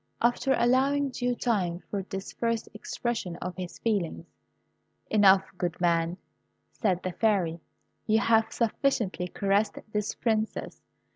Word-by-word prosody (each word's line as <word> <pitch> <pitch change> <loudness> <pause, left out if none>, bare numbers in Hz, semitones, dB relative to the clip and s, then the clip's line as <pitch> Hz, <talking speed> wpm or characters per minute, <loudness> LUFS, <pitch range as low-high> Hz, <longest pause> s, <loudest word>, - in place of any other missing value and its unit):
After 245 +3 +2
allowing 270 +3 +3
due 245 0 -1
time 185 -8 -1
for 200 - -1
this 195 0 -6
first 230 -1 -1
expression 215 -3 -3
of 180 +1 -5
his 180 -2 -6
feelings, 200 -7 -1 0.9
"Enough, 195 -2 +6 0.2
good 175 -1 -2
man," 170 0 +1 0.5
said 185 -6 0
the 185 - -2
Fairy. 180 -5 +1 0.5
"You 220 0 +4
have 225 +1 +3
sufficiently 225 -6 0
caressed 200 +3 +1 0.2
this 210 -1 -1
Princess. 220 -2 -1
210 Hz, 125 wpm, -28 LUFS, 180-230 Hz, 0.9 s, Enough